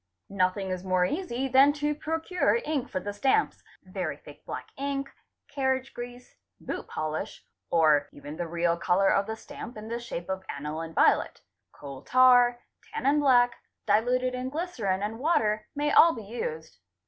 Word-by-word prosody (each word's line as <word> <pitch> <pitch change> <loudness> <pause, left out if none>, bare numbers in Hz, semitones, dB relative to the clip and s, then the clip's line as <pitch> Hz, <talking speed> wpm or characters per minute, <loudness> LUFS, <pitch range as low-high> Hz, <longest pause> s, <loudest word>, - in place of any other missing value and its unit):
Nothing 190 0 0
is 185 0 -4
more 185 -1 +2
easy 270 - -2
than 270 +3 +5
to 295 0 -1
procure 325 +6 0
ink 295 -5 -2
for 185 - -2
the 205 +2 -5
stamps; 270 - +1 0.2
very 185 -6 -4
thick 145 -1 -15
black - - -6
ink, 275 0 -3 0.4
carriage 265 -2 -1
grease, 245 +1 -9 0.2
boot - - -6
polish, 155 0 -4 0.2
or 155 -3 +3
even 145 +1 -9
the 170 +1 -4
real 170 0 +1
colour 190 +3 +2
of 195 - +2
the 220 - -3
stamp 230 +1 -10
in 215 +1 -8
the 235 +1 -3
shape 205 -8 -6
of 190 0 -3
aniline 155 +3 -5
violet, - - +3 0.3
coal 140 -2 -10
tar, 245 -1 +5 0.3
tannin 280 +3 +1
black, 245 -4 +4 0.3
diluted 250 +4 +2
in 255 +1 -3
glycerine 250 - -2
and 220 +2 -4
water, 215 -8 +1
may 295 +1 0
all 335 0 +7
be 225 - -7
used. 160 - -6
225 Hz, 160 wpm, -27 LUFS, 185-265 Hz, 0.4 s, all